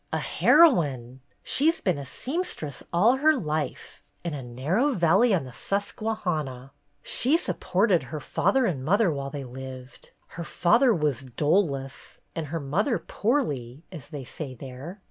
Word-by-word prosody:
"A - - 0
heroine! 135 - +3 0.2
She 295 +4 +2
's 330 - -1
been 180 -7 0
a 140 - -7
seamstress 255 - -4
all 220 +10 +4
her 310 +3 +4
life, 155 - -4 0.2
in 170 -2 -3
a 145 - -4
narrow 150 - 0
valley 195 +5 +4
on 185 -7 +2
the 130 -2 -10
Susquehanna. 180 - -3 0.3
She 280 +7 +2
supported 190 - +1
her 155 - -4
father 260 - +1
and 145 - -1
mother 195 +4 +3
while 140 -2 -4
they 140 0 -6
lived. 130 0 -10 0.2
Her 170 - -6
father 230 - +3
was 150 - 0
'doless' 140 - -1 0.2
and 160 -2 -3
her 165 +3 -3
mother 190 - 0
'poorly' 150 - -2
as 155 -6 -9
they 145 -3 -7
say 130 +1 -7
there. 135 - -9
160 Hz, 150 wpm, -26 LUFS, 135-210 Hz, 0.3 s, all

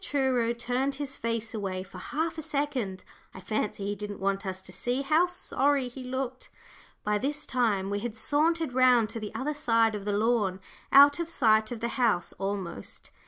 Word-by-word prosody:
Truro 260 -4 +1
turned 250 +3 -1
his 275 -1 -5
face 230 0 -3
away 190 -4 -3
for 190 - -11
half 320 +2 -2
a - - -3
second. 280 - -2 0.3
I - - -7
fancy 210 0 -2
he 205 - -1
didn't 205 0 -6
want 195 +1 -1
us 190 0 -5
to - - -8
see 250 +3 -2
how 310 +5 +4
sorry 285 -6 0
he 255 +1 -9
looked. 260 0 -4 0.5
By 210 0 +1
this 295 +4 -2
time 210 -6 0
we 205 - 0
had 225 0 -4
sauntered 310 +4 +1
round 250 -3 +5
to 225 +1 -5
the 215 -1 -6
other 295 +3 -1
side 230 -6 +3
of 205 -1 -5
the 205 -1 0
lawn, 210 -4 +1 0.3
out 285 +2 +8
of 335 -1 -2
sight 220 -7 +3
of 235 - -5
the 235 - -1
house 210 -8 +2
almost. 195 - -4
235 Hz, 190 wpm, -28 LUFS, 205-275 Hz, 0.5 s, out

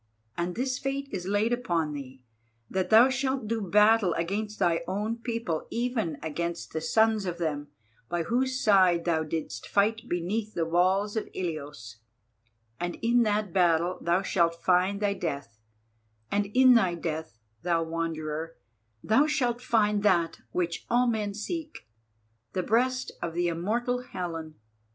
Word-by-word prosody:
And 175 +1 -2
this 255 +1 -1
fate 275 +1 -3
is 185 -2 -4
laid 205 +4 +1
upon 170 -11 -1
thee, 135 -2 -8 0.5
that 190 -1 -1
thou 230 +4 +7
shalt 260 -2 -1
do 225 0 -1
battle 210 -1 +4
against 210 +5 -2
thy 170 -1 +2
own 210 +5 -2
people, 230 -8 -3
even 230 - -1
against 170 +2 -4
the 160 - -2
sons 220 +2 +2
of 175 -1 -3
them 150 -3 -2 0.4
by 175 -1 -1
whose 255 +5 0
side 185 -7 +4
thou 165 -2 +2
didst 155 -8 -5
fight 220 +3 +1
beneath 205 +5 -2
the 165 - 0
walls 185 +5 +2
of 220 - -2
Ilios, 145 - -5 0.8
and 175 0 -3
in 240 +1 +4
that 210 -4 0
battle 175 -1 +2
thou 175 +3 +1
shalt 170 -3 +2
find 185 +3 +2
thy 205 -1 +2
death, 140 - -5 0.7
and 205 0 +1
in 255 +4 +6
thy 190 -7 +3
death, 160 -7 -4 0.2
thou 170 -2 +1
Wanderer, 165 -1 -3 0.5
thou 270 +8 +4
shalt 245 -5 0
find 210 -4 +2
that 175 -5 +2
which 170 -2 -2
all 245 +1 +3
men 215 -4 -1
seek, 310 - -5 0.7
the 185 - -1
breast 255 +5 +1
of 165 -1 -4
the 175 0 +1
immortal 235 +9 -1
Helen. 165 -9 -6
190 Hz, 150 wpm, -28 LUFS, 165-225 Hz, 0.8 s, thou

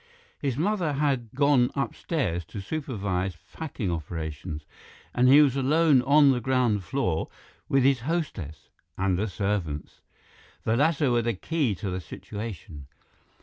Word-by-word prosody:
His 135 -4 -2
mother 175 -2 0
had 135 -5 0
gone 140 -3 +4
upstairs 130 - -2
to 105 - -8
supervise 95 - -3 0.2
packing 130 - -4
operations, 80 -1 -5 0.5
and 125 +1 +3
he 145 +3 +8
was 135 -3 +2
alone 145 +1 +4
on 140 +2 +6
the 125 -2 0
ground 120 -5 +1
floor 90 -10 -1 0.4
with 135 -1 +3
his 135 -1 +4
hostess—and 95 - -3
the 105 - 0
servants. 95 -7 -3 0.6
The 110 - +1
latter 145 0 +2
were 120 0 +3
the 115 -1 -1
key 140 - -1
to 95 +1 -4
the 90 0 -3
situation. 90 -5 -8
120 Hz, 135 wpm, -27 LUFS, 95-140 Hz, 0.6 s, he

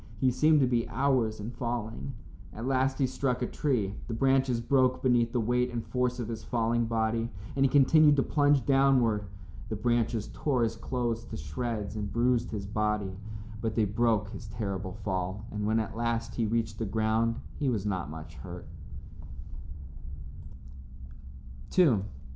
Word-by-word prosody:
He 130 +1 +3
seemed 150 +4 +4
to - - +5
be 120 -2 0
hours 130 -6 +1
in 105 +3 -5
falling. 115 - -4 0.4
At 115 - -6
last 130 0 +1
he 135 - +2
struck 125 -1 -1
a - - +2
tree. 120 -9 -1
The 115 - -3
branches 130 -1 +2
broke 130 +1 +2
beneath 120 -2 +3
the 125 - 0
weight 125 +2 +1
and 115 -1 -4
force 125 -1 -1
of 120 - -3
his 110 -2 -5
falling 115 0 0
body, 115 0 0 0.3
and 135 - +2
he 135 - +4
continued 145 +2 +6
to 135 - +2
plunge 145 -3 +3
downward. 130 -6 +3 0.4
The 110 - -2
branches 115 0 0
tore 130 -5 +1
his 115 0 0
clothes 120 -1 -2
to - - -7
shreds 100 - -4
and 105 -2 -3
bruised 120 0 +2
his 100 -3 -4
body, 105 -1 -1 0.5
but 110 -2 -2
they 110 - +3
broke 105 -1 +1
his 110 +1 -8
terrible 100 -3 -4
fall, 95 +1 -2
and 105 0 -2
when 110 +1 +2
at 110 0 -3
last 115 0 -1
he 115 -2 0
reached 110 -1 -1
the 115 - -1
ground 110 +2 +1 0.2
he 140 - +1
was 110 -5 -1
not 95 -7 -2
much 80 0 -8
hurt. 90 -1 -8
115 Hz, 165 wpm, -29 LUFS, 105-125 Hz, 0.5 s, continued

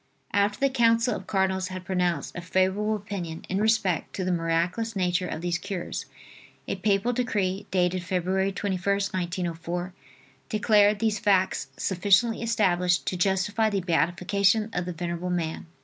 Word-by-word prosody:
After 205 +1 +2
the 275 -1 +2
counsel 230 -1 +3
of 190 - -8
cardinals 190 -1 0
had 185 0 -7
pronounced 180 -2 -1
a 175 - -4
favorable 190 +4 +1
opinion 190 -6 -6
in 190 +2 0
respect 215 -5 +1
to 190 - -2
the 185 - 0
miraculous 175 +6 0
nature 180 -1 0
of 160 - -5
these 175 0 -1
cures, 195 -2 -5 0.6
a - - -2
papal 210 +3 +1
decree, 205 -6 -1
dated 180 0 +1
Feb. 180 0 -2
21st, 195 +1 0
1904, 175 0 -3 0.6
declared 210 -1 +4
these 215 -1 0
facts 195 -3 +2
sufficiently 200 +5 +2
established 180 -6 +1
to - - -1
justify 195 +4 +1
the 200 -2 -1
beatification 185 +5 +1
of 175 0 -1
the 180 - -3
venerable 170 +1 -4
man. 170 -2 -2
190 Hz, 150 wpm, -26 LUFS, 180-205 Hz, 0.6 s, declared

